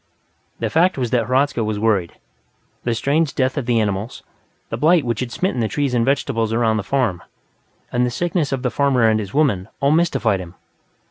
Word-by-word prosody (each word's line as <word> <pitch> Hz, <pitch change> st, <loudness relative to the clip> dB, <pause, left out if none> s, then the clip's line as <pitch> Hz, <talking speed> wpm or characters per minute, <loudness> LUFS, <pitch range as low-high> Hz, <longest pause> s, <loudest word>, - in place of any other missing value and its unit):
The -, -, -3 dB
fact 175 Hz, +2 st, +3 dB
was 125 Hz, -3 st, -2 dB
that 115 Hz, -3 st, +1 dB
Hradzka 130 Hz, -1 st, +1 dB
was 110 Hz, -1 st, -2 dB
worried. 105 Hz, -5 st, +1 dB, 0.7 s
The 120 Hz, -1 st, 0 dB
strange 145 Hz, +5 st, 0 dB
death 130 Hz, 0 st, +1 dB
of 140 Hz, -5 st, -3 dB
the 120 Hz, -2 st, +2 dB
animals, 105 Hz, +1 st, -3 dB, 0.5 s
the -, -, -3 dB
blight 160 Hz, -1 st, +3 dB
which 115 Hz, -2 st, -1 dB
had 125 Hz, -2 st, -3 dB
smitten 180 Hz, -2 st, -1 dB
the 115 Hz, -, +1 dB
trees 140 Hz, +1 st, -1 dB
and 120 Hz, -2 st, +2 dB
vegetables 115 Hz, -4 st, 0 dB
around 115 Hz, -1 st, +1 dB
the -, -, -1 dB
farm, 115 Hz, -7 st, 0 dB, 0.7 s
and 125 Hz, 0 st, +1 dB
the 125 Hz, -, +1 dB
sickness 165 Hz, +3 st, -1 dB
of 135 Hz, -1 st, -2 dB
the 125 Hz, -, 0 dB
farmer 140 Hz, -4 st, +2 dB
and 110 Hz, 0 st, +2 dB
his 100 Hz, +1 st, -6 dB
woman, 125 Hz, -11 st, +2 dB
all 140 Hz, +1 st, +2 dB
mystified 125 Hz, -, +2 dB
him. 90 Hz, -1 st, -9 dB
125 Hz, 200 wpm, -20 LUFS, 110-140 Hz, 0.7 s, fact